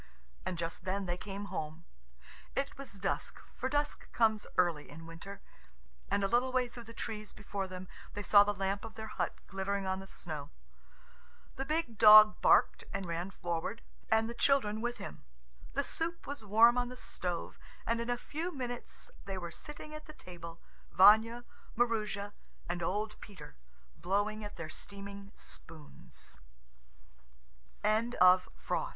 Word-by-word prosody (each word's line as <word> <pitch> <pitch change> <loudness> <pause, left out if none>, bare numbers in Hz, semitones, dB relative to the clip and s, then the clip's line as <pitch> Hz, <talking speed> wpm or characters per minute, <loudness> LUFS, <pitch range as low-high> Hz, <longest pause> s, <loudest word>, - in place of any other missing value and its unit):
And 180 - -2
just 165 +1 -4
then 190 +1 -1
they 175 -1 -1
came 200 +2 -6
home. 155 0 -4 0.7
It 275 0 -1
was 275 -4 -9
dusk, 195 0 -3
for 260 - -2
dusk 290 +1 -1
comes 220 -2 +3
early 170 -5 +2
in 165 +3 -10
winter, 165 +5 -9 0.7
and 200 - +1
a - - +3
little 245 +4 +2
way 255 -1 +2
through 235 -1 -11
the 230 - -10
trees 215 -1 -5
before 200 -2 -4
them 185 0 -7 0.3
they 205 - -3
saw 205 0 +8
the 205 0 -1
lamp 195 +1 -1
of 225 -1 -8
their 220 0 -6
hut - - -2
glittering 195 0 -2
on 190 0 -1
the 195 - -9
snow. 150 -6 -6 1.1
The 270 +1 -4
big 305 -9 -1
dog 215 0 +10
barked - - +5
and 195 - -3
ran 170 +2 -2
forward, 170 - -3 0.3
and 220 0 +4
the 235 - -4
children 235 -4 +2
with 240 +1 -2
him. 75 - -8 0.5
The 280 - +1
soup 335 +4 -3
was 285 -5 -5
warm 230 +4 +6
on 245 0 -1
the 250 - -9
stove, 175 -7 -4 0.3
and 230 0 +1
in 235 - -4
a 245 - +1
few 320 +8 -4
minutes 245 -5 -5
they 195 -1 -3
were 170 -2 -5
sitting 300 +1 -8
at 305 0 -8
the 305 - -9
table, 170 - -10 0.3
Vanya, 220 +5 +6 0.3
Maroosia, 215 -4 0 0.3
and 175 0 -2
old 210 +5 -1
Peter, 190 - -11 0.4
blowing 205 +4 0
at 205 - -7
their 165 -2 -5
steaming 200 +3 -8
spoons. 155 -3 -9
205 Hz, 155 wpm, -33 LUFS, 185-235 Hz, 1.1 s, dog